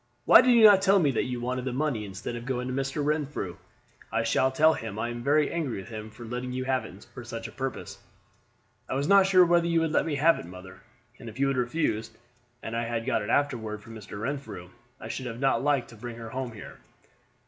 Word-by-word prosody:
"Why - - +9
did 250 -1 +4
you 230 - +6
not 205 -3 +8
tell 195 0 +4
me 155 -7 +3
that 120 - 0
you 125 -1 -4
wanted 125 +1 -3
the 130 -1 -3
money 130 -6 -1
instead 100 +4 -6
of 120 +1 -7
going 125 -1 -2
to 130 - -3
Mr. 135 +2 -2
Renfrew? 145 - -2 0.5
I 115 +1 0
shall 130 +3 +2
tell 155 +4 +4
him 110 -6 -6
I 120 +2 -2
am 120 0 -6
very 145 +3 +2
angry 155 -10 -2
with 95 - -8
him 110 -1 -7
for 120 +2 -11
letting 125 +2 -5
you 130 0 -3
have 130 -1 0
it 95 - -12
for 125 - -8
such 115 -1 -6
a - - -11
purpose." 130 +1 -6 0.9
"I - - -2
was 140 +2 -1
not 200 -1 +6
sure 185 -2 +6
whether 170 0 +3
you 170 -1 +2
would 160 -1 0
let 160 - +1
me 150 - -1
have 160 +4 +4
it, - - -9
mother; 90 +1 -12 0.4
and 115 - -8
if 110 +4 -12
you 140 0 +2
had 135 - -1
refused, 120 -3 -1 0.5
and 115 - -5
I 115 0 -1
had 115 -1 -3
got 125 -4 0
it 105 - -5
afterward 110 -7 -1
from 115 - -12
Mr. 105 -2 -9
Renfrew, 110 -8 -5 0.3
I - - -8
should 130 - -5
not 135 0 +3
have - - -5
liked 140 -4 +1
to 115 - -13
bring 120 +2 -8
her 115 -1 -8
home 130 -2 -4
here." 110 - -11
125 Hz, 245 wpm, -27 LUFS, 115-145 Hz, 0.9 s, Why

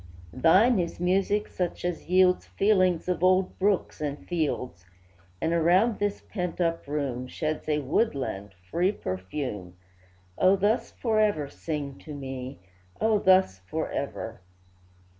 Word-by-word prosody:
Thine 190 - +5
is 170 -1 -3
music 195 +4 +1
such 175 -1 -3
as 175 -1 -3
yields 180 0 +4
Feelings 185 -5 +2
of 180 -1 -1
old 185 0 +3
brooks 195 -4 0
and 145 -1 -4
fields, 140 - -2 0.6
And, 165 - 0
around 180 +7 +3
this 205 0 -1
pent 180 -4 -4
up 165 -3 0
room, 135 -4 -2
Sheds 155 +3 -3
a 150 - +2
woodland, 130 - -1 0.2
free 180 +3 +2
perfume; 95 - -5 0.6
O, 185 +1 +5
thus 205 +4 +1
forever 215 - +1
sing 145 -4 -5
to 150 -2 -9
me! 130 -3 -6 0.4
O, 220 -1 +3
thus 185 - +4
forever! 115 -1 -4
170 Hz, 125 wpm, -27 LUFS, 140-190 Hz, 0.6 s, Thine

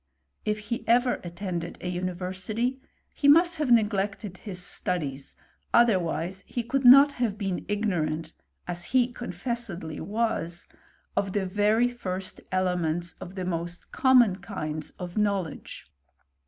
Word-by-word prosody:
If 210 0 +1
he 215 +3 -4
ever 245 +2 +3
attended 175 -1 -5
a - - -5
university, 185 +8 -2 0.3
he 285 - +1
must 335 +4 +6
have 300 -4 -1
neglected 205 -3 +1
his 190 -3 -5
studies, 145 -6 -2 0.4
other? 235 -5 +6
wise 175 +3 -3
he 240 - -3
could 270 +3 -1
not 275 +3 +9
have 240 -6 -1
been 195 -4 -2
ignorant, 170 -7 -1 0.3
as 175 -1 -4
he 250 -1 +2
confess 240 0 -3
edly 165 -4 -6
was, 205 -6 -2 0.5
of 195 -1 0
the 200 -2 0
very 210 +5 +3
first 190 -6 -5
elements 175 -2 0
of 180 - -8
the 185 -2 -3
most 175 0 -4
common 245 -7 +5
kinds 155 -6 -5
of 180 +2 -4
knowledge. 200 -6 -2
195 Hz, 135 wpm, -27 LUFS, 175-235 Hz, 0.5 s, not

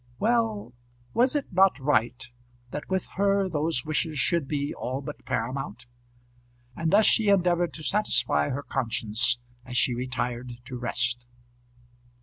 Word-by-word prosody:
Well; 220 - 0 0.4
was 255 +4 +3
it 285 -9 -2
not 190 +1 +5
right 130 -2 +1 0.5
that 150 - -6
with 190 0 0
her 200 0 +3
those 155 -5 0
wishes 155 0 0
should 165 0 +1
be 145 0 -2
all 130 +2 -3
but 145 +1 -8
paramount? 130 -1 -3 0.9
And 165 -1 -1
thus 205 +4 +5
she 220 -3 +4
endeavoured 175 -3 +3
to 155 - -7
satisfy 120 - +1
her 145 +3 -3
conscience 120 -1 0 0.2
as 125 -1 -4
she 125 - +3
retired 125 0 -3
to 130 0 -7
rest. 120 0 -1
140 Hz, 135 wpm, -27 LUFS, 125-185 Hz, 0.9 s, not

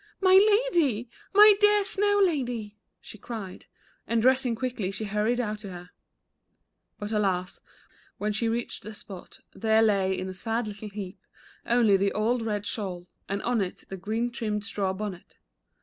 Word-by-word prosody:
"My 375 -1 +4 0.4
Lady, 245 -9 +1 0.2
my 420 +1 +8
dear 415 -1 +5
Snow 410 +1 +2
Lady," 245 - -2 0.2
she 215 - -12
cried, 205 -5 -8 0.4
and 230 - +1
dressing 255 0 +3
quickly 230 -5 -3
she 195 +2 -5
hurried 210 +4 0
out 215 -3 -2
to 205 -2 -8
her. 180 -1 -10 1.1
But 205 0 -6
alas, 190 -4 -1 0.6
when 210 +1 -1
she 225 +2 0
reached 235 +1 -3
the 215 +1 -9
spot 190 -3 -11
there 220 0 +3
lay 195 -3 +2
in 185 - -4
a 190 - -5
sad 225 +4 -2
little 210 +1 -7
heap 200 -2 -7 0.5
only 230 -4 +4
the 200 +1 0
old 230 +3 +1
red 210 -2 -2
shawl, 190 -4 -4 0.2
and 200 +1 -2
on 240 -2 +1
it 185 -2 -4
the 195 - -5
green 220 +6 -2
trimmed 210 -4 -3
straw 200 -2 -1
bonnet. 190 -2 -7
215 Hz, 165 wpm, -27 LUFS, 200-240 Hz, 1.1 s, my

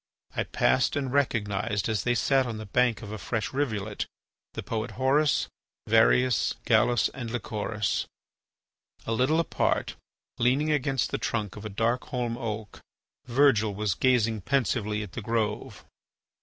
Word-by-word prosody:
I - - 0
passed - - +2
and 135 -3 -2
recognised, 105 -6 0
as 110 -3 0
they 120 -1 +1
sat 135 +1 +2
on 115 -2 -4
the 110 - -7
bank 120 +2 +1
of 105 - -7
a 110 - -5
fresh 115 +1 -3
rivulet, 110 -7 -2 0.5
the - - -4
poet 110 0 -3
Horace, 140 +3 +2 0.4
Varius, 115 +2 +3
Gallus, 120 0 +3
and 120 -3 -6
Lycoris. 105 -3 -2 1.0
A - - -3
little 130 +8 +2
apart, 165 - 0 0.4
leaning 135 +6 +2
against 135 -3 0
the - - -1
trunk 105 -4 -2
of 105 0 -9
a - - -3
dark 115 +5 0
holm 120 -2 -2
oak, 110 -3 -5 0.5
Virgil 120 -5 +3
was 105 -2 0
gazing 115 -2 +2
pensively 110 -4 0
at 100 - -9
the 115 - -6
grove. 110 -1 -2
115 Hz, 145 wpm, -27 LUFS, 105-130 Hz, 1.0 s, Varius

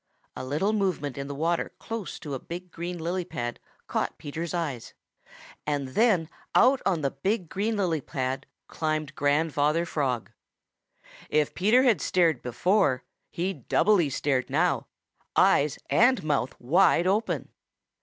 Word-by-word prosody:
A - - -5
little 155 +11 0
movement 180 - -1
in 140 0 -5
the 140 - -5
water 165 +4 -1
close 225 -4 -5
to 145 - -5
a 135 - -3
big 175 +4 -8
green 175 +1 -5
lily 175 +3 -2
pad 120 -7 -5 0.3
caught - - -2
Peter's 160 +3 -5
eyes, 150 -9 -4 0.7
and 145 -3 -1
then 190 - +3 0.3
out 260 +1 +5
on 180 -5 +1
the 140 -2 0
big 185 +4 -2
green 215 +3 -1
lily 170 -6 0
pad 130 0 -3 0.2
climbed 155 -3 -2
Grandfather 150 +2 +1
Frog. 135 -8 -2 1.0
If 150 -1 +1
Peter 215 +8 +4
had 240 -5 +3
stared 165 -7 +2
before 140 - +1 0.3
he 185 +3 -2
doubly 175 - +2
stared 135 -1 0
now, - - +1 0.5
eyes 145 -1 +4
and 250 -2 +4
mouth 140 -4 -1
wide 170 +6 +4
open. 205 +4 0
160 Hz, 140 wpm, -27 LUFS, 140-190 Hz, 1.0 s, out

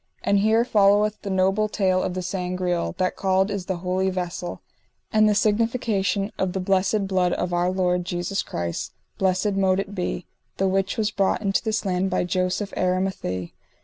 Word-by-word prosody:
And 200 0 +3
here 220 +3 +3
followeth 210 -1 +3
the 200 - -5
noble 195 +3 +2
tale 185 -3 +1
of 180 - -2
the 185 - -3
Sangreal, 180 - -2
that 185 - 0
called 190 +1 +1
is 200 -3 -4
the 190 - -1
Holy 185 +1 +1
Vessel; 175 -1 -4 0.5
and 215 0 +5
the 210 - +2
signification 215 -2 +1
of 185 -1 0
the 190 - -2
blessed 195 +2 +1
blood 185 -2 +1
of 180 0 -2
our 175 +1 +2
Lord 180 -1 +1
Jesus 175 +3 -2
Christ, 85 0 -4 0.3
blessed 190 +2 +2
mote 190 -1 +2
it 200 +1 -4
be, 180 -2 -3 0.3
the 195 - +2
which 195 +1 0
was 215 -1 +1
brought 200 +1 0
into 195 -1 +1
this 220 -1 -1
land 185 0 0
by 185 - +1
Joseph 185 +3 -1
Aramathie. 185 - -1
190 Hz, 180 wpm, -24 LUFS, 180-200 Hz, 0.5 s, and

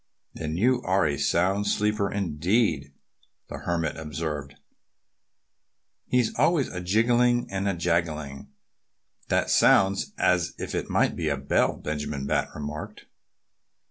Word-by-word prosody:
"Then 80 0 -4
you 125 +5 +2
are 95 -3 +2
a 75 -2 0
sound 95 +8 +1
sleeper 105 0 0
indeed," 90 - 0 0.6
the - - -6
Hermit 85 -3 -2
observed. 75 -2 -5 1.5
"He's 125 -3 +1
always 165 -6 +3
a 90 - -5
jingling 120 +5 +2
and 95 +1 -2
a 95 - -1
jangling." 80 -5 -2 0.8
"That - - +1
sounds 95 0 +4
as 90 -1 +1
if - - -5
he - - -1
might - - +2
be 80 -3 -1
a 70 - 0
bell," 70 +1 +1
Benjamin 75 -2 -4
Bat - - 0
remarked. 75 +1 -7
85 Hz, 125 wpm, -26 LUFS, 75-100 Hz, 1.5 s, sounds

